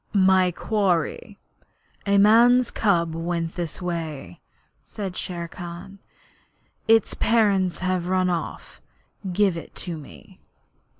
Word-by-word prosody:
'My 190 -1 +4
quarry. 195 +1 -1 0.7
A 200 0 +3
man's 235 +4 +5
cub 170 -6 +1
went 165 0 -3
this 175 0 -5
way,' 155 - -5 0.4
said 195 -4 -6
Shere 170 -2 -4
Khan. 180 +3 -9 0.9
'Its 225 -2 +4
parents 200 -6 +2
have 185 -1 -1
run 185 0 +1
off. 175 -2 -4 0.5
Give 195 -1 +2
it 165 - -9
to 170 -3 -5
me.' 85 - -15
185 Hz, 110 wpm, -24 LUFS, 170-200 Hz, 0.9 s, man's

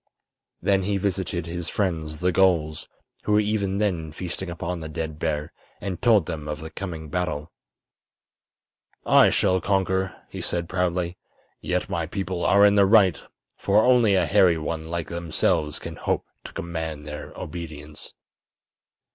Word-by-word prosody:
Then 95 -1 +3
he 100 +1 0
visited 95 -3 -2
his 85 0 -4
friends, 80 -6 -2
the 90 0 +3
gulls, 85 -5 +2 0.3
who 105 - +1
were 105 - +5
even 105 -2 0
then 90 -7 -1
feasting 90 +3 -5
upon 85 +1 -4
the 80 -1 -6
dead 80 0 -4
bear, 75 0 -2 0.3
and 95 -3 -5
told 110 -8 +5
them 75 -2 -5
of 75 0 -4
the 80 +1 -8
coming 80 -5 -6
battle. 85 -2 -3 1.5
"I - - +6
shall 95 -2 +2
conquer," 95 -1 0
he - - -7
said, 85 -1 -2
proudly. 90 -1 -1 0.4
"Yet 90 0 -1
my 85 -2 -2
people 95 -1 -3
are 100 +1 +6
in 100 - +6
the 100 -1 +5
right, 95 -7 +5 0.3
for 105 +2 +3
only 120 -5 +5
a 90 -2 +3
hairy 85 +2 +4
one 80 0 -4
like 85 -2 -3
themselves 80 -3 0
can - - -8
hope - - -1 0.2
to - - -7
command 80 -3 -4
their 75 0 -7
obedience." 75 -2 -8
85 Hz, 155 wpm, -25 LUFS, 80-95 Hz, 1.5 s, I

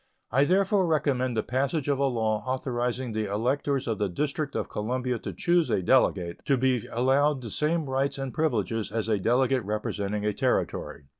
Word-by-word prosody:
I 135 +4 +4
therefore 190 +2 +2
recommend 130 -6 +1
the 110 - +1
passage 135 +4 -1
of 140 -2 +1
a 140 - +3
law 110 -4 0
authorizing 125 -1 -2
the 110 -2 -2
electors 130 +5 0
of 110 -2 -1
the 105 -2 0
District 145 - -2
of - - -1
Columbia 125 +3 -2
to - - -5
choose 175 -2 +1
a 95 - +1
Delegate, 90 -6 +2
to 140 - +3
be 130 -3 +1
allowed 135 +3 +2
the 115 - -6
same 155 +5 0
rights 135 +2 0
and 135 -2 -4
privileges 115 -8 -1
as 110 0 -2
a 110 -2 +1
Delegate 125 +4 +2
representing 105 0 -2
a 105 - +1
Territory. 75 - -1
130 Hz, 180 wpm, -27 LUFS, 110-140 Hz, -, I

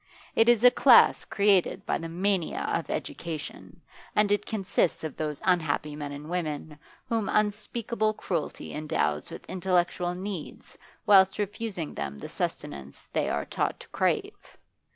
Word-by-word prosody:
It 225 +1 +4
is 240 -1 +4
a 250 - +9
class 250 -1 +6
created 200 -3 +2
by - - 0
the 165 0 -6
mania 185 0 0
of - - -2
education, 165 +1 -6 0.3
and 210 -1 +3
it 205 0 +1
consists 195 -6 0
of 155 -3 -4
those 150 -2 -3
unhappy 155 -4 +1
men 145 -1 -5
and 145 +1 -8
women 155 -3 -4 0.3
whom 225 -3 -1
unspeakable 215 +1 0
cruelty 170 -7 -4
endows 150 - -1
with - - -9
intellectual 180 -1 0
needs 185 -3 -7 0.3
whilst 190 -2 +6
refusing 205 -5 -3
them 70 0 -4
the - - -8
sustenance 70 0 -5
they - - +1
are - - -1
taught - - -2
to - - -13
crave. - - -2
180 Hz, 145 wpm, -28 LUFS, 155-205 Hz, 0.3 s, a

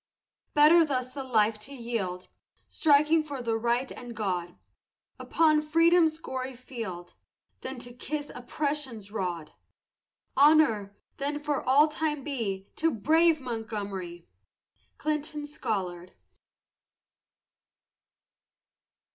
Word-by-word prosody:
Better 310 +3 +7
thus 255 -4 -2
the 275 - -5
life 220 -4 +2
to 275 +7 -10
yield, 210 -7 -4 0.4
Striking 305 +1 +4
for 285 -3 -6
the 230 -1 0
right 235 +3 0
and 240 -1 -9
God, 180 -5 -2 0.6
Upon 310 -2 +3
Freedom's 330 +1 +4
gory 260 -4 -5
field, 225 -9 -7 0.5
Than 265 0 -6
to 245 0 -8
kiss 290 +4 -5
Oppression's 255 -5 -4
rod! 175 -7 -4 0.8
Honor, 270 -10 +4 0.2
then, 285 +1 -2
for 295 -1 -1
all 280 +4 +5
time 300 -2 -2
be 205 -9 -3
To 325 - +2
the - - -4
brave 320 +7 +3
Montgomery! 205 -8 -5 0.7
CLINTON 300 0 -3
SCOLLARD. 190 -11 -4
255 Hz, 105 wpm, -28 LUFS, 215-300 Hz, 0.8 s, Better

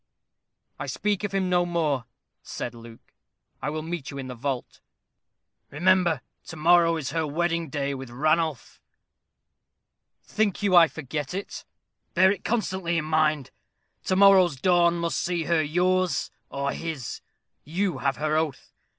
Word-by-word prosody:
"I - - -4
speak 210 -2 -1
of 205 - -2
him 195 -1 0
no 180 -1 +3
more," 155 -7 -1 0.4
said 120 - -6
Luke. 115 -1 -14 0.5
"I 150 - -2
will 155 +1 -4
meet 165 -3 -5
you 140 - -7
in 130 -1 -6
the - - -5
vault." 130 +1 -4 0.9
"Remember, 175 -1 +2 0.3
to - - -8
morrow 165 +1 +4
is 140 -4 -4
her 160 0 -1
wedding 170 +1 -1
day 140 0 -2
with 135 -2 -7
Ranulph." 155 +2 -1 1.4
"Think 210 -1 -1
you 195 -3 +3
I 170 -1 +8
forget 150 +1 -5
it?" 195 - -6 0.5
"Bear 190 +2 +6
it 200 -2 -4
constantly 190 -6 -1
in 160 - -1
mind. 155 -3 +1 0.5
To 185 - +1
morrow's 190 -4 +6
dawn 175 +3 +3
must 170 0 -1
see 175 -2 -1
her 165 0 +2
yours 180 +4 +1 0.2
or 140 0 -2
his. 155 -7 -5 0.4
You 175 0 -2
have 135 -1 0
her 155 0 0
oath. 155 -3 -2
165 Hz, 150 wpm, -26 LUFS, 145-180 Hz, 1.4 s, I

